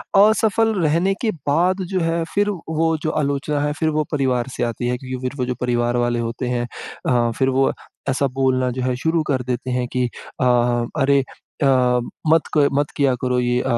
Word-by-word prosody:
असफ़ल 220 +2 +4
रहने 165 +5 +2
के 230 - +1 0.2
बाद 180 +6 +2
जो 185 - +1
है 165 0 0
फ़िर 205 +1 +2
वो 160 -3 -1
जो 155 - 0
आलोचना 145 +1 -1
है 145 0 0
फ़िर 160 +1 0
वो 155 0 +1
परिवार 130 -4 0
से - - -1
आती 120 +1 -2
है 125 - 0
क्यूँकि 130 0 -6
फ़िर 135 - -6
वो 125 - +1
जो 125 0 -2
परिवार 120 0 +1
वाले 120 0 +1
होते 115 +2 -3
हैं 120 -1 -1 0.4
अ, 120 -2 +2
फ़िर 130 +3 +1
वो 135 +1 +2 0.4
ऐसा 135 +1 +1
बोलना 130 -1 +2
जो 130 +1 -4
है 125 -1 0
शुरू 160 +5 0
कर 130 -3 0
देते 125 +1 -3
हैं 125 0 -1
कि 125 -1 +2 0.4
अ, - - +3 0.6
अरे 140 +1 +4 0.4
अ, - - +4 0.7
मत 165 - +6 0.2
क 145 -1 +5
मत 145 +1 0
किया 140 -2 +3
करो 125 -1 +1
ये 125 0 +1
135 Hz, 200 wpm, -21 LUFS, 125-160 Hz, 0.7 s, मत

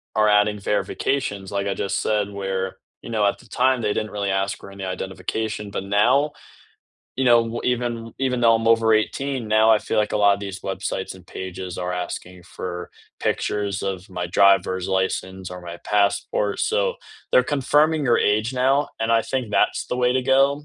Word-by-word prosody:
are 105 -1 +4
adding 105 0 +3
verifications, 105 0 -2
like 100 0 -1
I 100 - 0
just 100 - -2
said, 105 -2 0
where, 95 -1 -3 0.2
you - - -10
know, 110 -3 +1
at 100 - +1
the - - -18
time, 130 0 +2
they 105 -2 0
didn't 110 - -3
really 100 -1 -2
ask 95 +1 -1
for 100 - -12
any 100 -1 -7
identification, 100 +3 -4
but 95 - -3
now, 120 +9 +3 0.8
you 130 - -1
know, 120 -1 +6
w 115 +1 -4
even 120 -2 -2
even 130 -2 0
though 115 -1 +5
I'm 115 0 0
over 115 -1 +4
18, 130 +2 -1
now 110 +1 +5
I 110 - +6
feel 110 - -2
like 105 0 +1
a - - +1
lotta 100 -1 +4
these 100 -2 -6
websites 95 0 -4
and 90 -1 -15
pages 95 -1 -6
are 90 0 -2
asking 90 0 -5
for 90 -1 -6 0.3
pictures 100 -1 -1
of 95 0 -4
my 90 -2 -4
driver's 95 0 +3
license 95 -1 -2
or 90 0 -7
my 85 -1 -8
passport, 100 0 +1
so - - +1 0.4
they're 125 - +5
confirming 150 +3 +2
your 120 -3 +3
age 110 +4 +1
now 135 +3 +2
and 115 +1 +1
I 115 - +4
think 125 -2 -3
that's - - +1
the - - -3
way 125 0 +2
to 130 - +1
go. 135 +2 +3
105 Hz, 190 wpm, -23 LUFS, 95-120 Hz, 0.8 s, know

